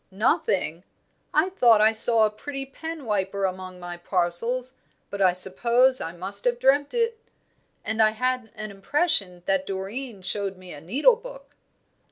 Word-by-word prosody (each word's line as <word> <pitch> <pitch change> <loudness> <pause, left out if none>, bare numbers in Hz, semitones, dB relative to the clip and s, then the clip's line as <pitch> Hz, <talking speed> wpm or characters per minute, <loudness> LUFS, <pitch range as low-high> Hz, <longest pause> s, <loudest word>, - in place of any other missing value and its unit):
"Nothing! 195 - 0 0.5
I 310 +5 +2
thought 240 - +4
I 215 +1 +5
saw 225 0 +4
a 210 - 0
pretty 275 +5 -6
penwiper 215 - -3
among 185 0 -7
my 175 0 -7
parcels, 195 +9 -1 0.4
but 200 - -4
I 185 -2 +5
suppose 235 +8 +3
I 165 - -4
must 190 +4 -6
have 245 -1 +2
dreamt 280 - +2
it; 460 -1 0 0.7
and 220 +1 0
I 215 - +6
had 250 +1 -2
an 215 0 -6
impression 195 - 0
that 190 -1 0
Doreen 200 +3 -5
showed 195 0 -1
me 185 -1 -11
a 145 - -10
needle 280 - +3
book." - - -12
215 Hz, 155 wpm, -25 LUFS, 190-260 Hz, 0.7 s, I